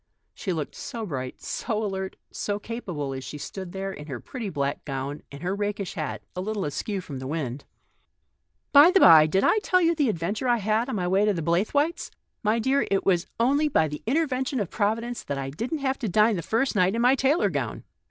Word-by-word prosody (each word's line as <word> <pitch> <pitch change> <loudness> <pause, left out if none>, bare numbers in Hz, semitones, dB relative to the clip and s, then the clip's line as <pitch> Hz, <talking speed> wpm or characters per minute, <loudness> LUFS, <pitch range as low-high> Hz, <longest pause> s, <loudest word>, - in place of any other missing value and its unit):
She 195 - -4
looked 155 -4 -3
so 230 -5 -6
bright, 130 -8 -5
so 220 -2 -2
alert, 190 -1 -4 0.2
so 205 -1 -2
capable, 180 - -5
as 130 0 -6
she 150 - -7
stood 185 +4 -7
there, 195 +1 -4
in 150 -3 -9
her 130 -5 -5
pretty 230 - -6
black 140 -4 -2
gown 135 +1 -4
and 140 +3 -9
her 185 +2 -1
rakish 205 -2 -3
hat, 155 -3 -4
a 180 - -2
little 210 0 -2
askew 190 +6 -3
with 140 -3 -6
the 130 - -6
wind. 140 -3 -4 0.5
" - - -50
By 290 +4 +9
the 385 - +4
bye, 160 - +8
did 190 +5 +1
I 435 - +4
tell 365 -3 +2
you 335 -1 +3
the 295 -6 +1
adventures 200 +6 -2
I 240 - +4
had 220 +4 0
on 260 - -2
my 180 -3 -1
visit 195 +3 +3
to 210 - +3
the 165 - -3
Blaythewaites? 220 - +1 0.3
My 215 +1 +2
dear, 265 +5 +1
it 195 -1 +1
was 180 -2 +2
only 280 +6 +3
by 160 - +2
the 150 0 -6
intervention 265 -2 0
of 200 -5 -3
Providence 230 +3 -1
that 140 - -4
I 135 0 -4
didn't 235 - -3
have 265 0 0
to 225 - -2
dine 215 +4 +4
the 175 - -2
first 225 - 0
night 190 +1 +3
in 230 - 0
my 250 +2 +6
tailor 275 +5 +2
gown. - - -3
205 Hz, 225 wpm, -26 LUFS, 160-240 Hz, 0.5 s, By